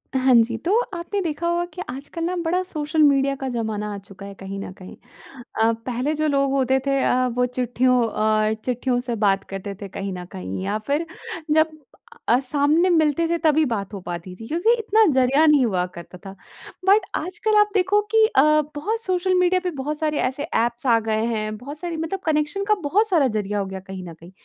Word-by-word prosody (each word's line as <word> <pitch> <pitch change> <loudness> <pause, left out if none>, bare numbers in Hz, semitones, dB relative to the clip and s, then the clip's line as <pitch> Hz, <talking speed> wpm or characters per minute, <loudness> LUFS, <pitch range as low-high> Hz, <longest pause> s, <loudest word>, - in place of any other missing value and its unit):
हाँ 260 0 +4
जी। 230 0 +3
तो 400 +5 +3 0.2
आपने 350 +4 -3
देखा 335 -1 -2
होगा 345 0 0
कि 365 - -6
आजकल 280 +6 -6
ना 360 +2 -1
बड़ा 360 +3 +1
सोशल 310 -3 -2
मीडिया 275 -1 +3
का 270 - -3
ज़माना 220 -3 -3
आ - - -5
चुका 195 0 -12
है 200 - -8
कहीं 195 +1 -7
न 195 - -6
कहीं 185 - -11 0.7
अ, 225 +1 +4
पहले 255 +4 -1
जो 310 +1 0
लोग 275 -2 +1
होते 265 -1 +2
थे 275 0 +2
अ, 255 0 +2
वो 250 0 0
चिट्ठियों 250 0 +1
अ, 215 0 +1
चिट्ठियों 250 0 0
से 245 -2 -3
बात 195 -2 +2
करते 195 +1 -6
थे 200 - -5
कहीं 195 +1 -5
न 180 -1 -7
कहीं 95 - -5
या 200 +2 -1
फ़िर 295 +4 0 0.5
जब 315 +1 +4 0.6
अ, 240 - +4
सामने 290 +6 +2
मिलते 325 -1 +2
थे 340 - 0
तभी 315 0 +4
बात 210 -5 -3
हो 200 - -5
पाती 175 +1 -7
थी 225 +3 -10
क्योंकि 345 - +2
इतना 440 0 +3
ज़रिया 265 +4 +4
नहीं 295 -5 +5
हुआ 180 -4 0
करता 170 +1 -10
था। 195 0 -8 0.5
बट 395 +1 +5
आजकल 370 +6 -1
आप 420 0 +4
देखो 400 +1 +3
कि 445 -1 +5
अ, 350 - +3 0.3
बहुत 435 +10 -2
सोशल 370 -2 0
मीडिया 360 +1 +3
पे 360 - -1
बहुत 295 +3 -3
सारे 305 -1 0
ऐसे 265 +3 -2
ऐप्स 240 -5 -1
आ 230 -3 +4
गए 220 0 -1
हैं 215 -2 -2
बहुत 280 +6 -8
सारी, 340 -1 -4
मतलब 325 +4 -3
कनेक्शन 305 +5 0
का 425 - +5
बहुत 420 +7 +3
सारा 325 -8 +3
ज़रिया 210 -3 -2
हो 200 - -1
गया 190 0 -6
कहीं 190 -1 -8
न - - -9
कहीं। 170 +2 -15
265 Hz, 215 wpm, -22 LUFS, 215-330 Hz, 0.7 s, नहीं